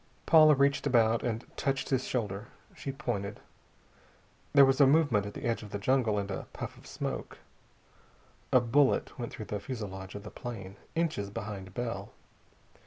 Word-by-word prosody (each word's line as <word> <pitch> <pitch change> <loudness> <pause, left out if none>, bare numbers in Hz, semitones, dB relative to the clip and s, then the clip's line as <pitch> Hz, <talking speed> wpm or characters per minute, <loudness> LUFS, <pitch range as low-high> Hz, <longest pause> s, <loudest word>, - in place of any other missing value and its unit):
Paula 155 -2 +7
reached 140 +1 +2
about 115 -3 +4
and 115 0 -2
touched 135 -1 -1
his 130 -2 +1
shoulder. 105 -3 -2 0.3
She 135 - -4
pointed. 110 -7 -3 1.1
There 140 -1 +8
was 135 +1 +3
a 140 - +8
movement 135 -9 +3
at 100 - -8
the - - -7
edge 115 -1 0
of 105 - -9
the 100 - -3
jungle 115 0 +2
and 100 -1 -2
a - - -5
puff - - -6
of - - -15
smoke. - - -4 1.1
A 130 - +7
bullet 130 +3 +2
went 120 - -4
through 110 - -7
the 105 - -3
fusilage 100 -5 -6
of 100 - -7
the 105 - -9
plane, 100 -6 -7 0.2
inches 155 -12 0
behind 100 -2 -6
Bell. 120 -1 -3
115 Hz, 170 wpm, -30 LUFS, 100-135 Hz, 1.1 s, There